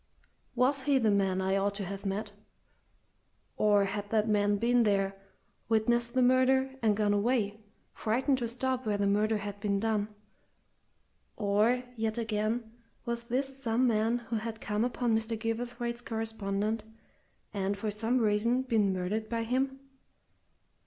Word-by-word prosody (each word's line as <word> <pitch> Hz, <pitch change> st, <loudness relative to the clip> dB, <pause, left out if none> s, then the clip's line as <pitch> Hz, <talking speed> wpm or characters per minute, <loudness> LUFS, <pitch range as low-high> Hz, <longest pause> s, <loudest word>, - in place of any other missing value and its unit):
Was 260 Hz, +3 st, +3 dB
he 275 Hz, +1 st, +3 dB
the 225 Hz, -5 st, +3 dB
man 195 Hz, -2 st, +1 dB
I 190 Hz, +1 st, +1 dB
ought 200 Hz, +1 st, 0 dB
to 200 Hz, -1 st, -3 dB
have 195 Hz, +2 st, -5 dB
met? 205 Hz, +2 st, -3 dB, 1.2 s
Or 205 Hz, -1 st, +4 dB
had 205 Hz, +1 st, -4 dB
that 215 Hz, 0 st, +2 dB
man 205 Hz, -1 st, +2 dB
been 240 Hz, +3 st, +3 dB
there, 195 Hz, -3 st, +1 dB, 0.5 s
witnessed 235 Hz, +2 st, +1 dB
the 255 Hz, -, +4 dB
murder, 260 Hz, +1 st, +3 dB
and 215 Hz, -3 st, +2 dB
gone 210 Hz, -1 st, +2 dB
away, 215 Hz, -1 st, 0 dB, 0.3 s
frightened 260 Hz, +5 st, 0 dB
to 240 Hz, -, -1 dB
stop 255 Hz, +2 st, -2 dB
where 210 Hz, -3 st, 0 dB
the 200 Hz, -, +1 dB
murder 210 Hz, +2 st, +2 dB
had 205 Hz, 0 st, -6 dB
been 200 Hz, -1 st, 0 dB
done? 215 Hz, -1 st, 0 dB, 1.3 s
Or 215 Hz, +4 st, +2 dB
yet 220 Hz, 0 st, -2 dB
again 220 Hz, 0 st, -1 dB, 0.3 s
was 235 Hz, -1 st, -3 dB
this 270 Hz, +3 st, -2 dB
some 235 Hz, +1 st, +1 dB
man 225 Hz, 0 st, +2 dB
who 235 Hz, -1 st, -4 dB
had 225 Hz, 0 st, -5 dB
come 210 Hz, 0 st, -1 dB
upon 240 Hz, -1 st, 0 dB
Mr. 225 Hz, +1 st, -1 dB
Gilverthwaite's 235 Hz, +1 st, -3 dB
correspondent, 220 Hz, -2 st, -2 dB, 0.7 s
and, 200 Hz, 0 st, -1 dB
for 210 Hz, +1 st, -2 dB
some 225 Hz, +4 st, 0 dB
reason, 230 Hz, +3 st, +2 dB
been 220 Hz, -6 st, +2 dB
murdered 195 Hz, +4 st, -2 dB
by 230 Hz, 0 st, -1 dB
him? 265 Hz, +3 st, -1 dB
220 Hz, 150 wpm, -30 LUFS, 205-240 Hz, 1.3 s, Or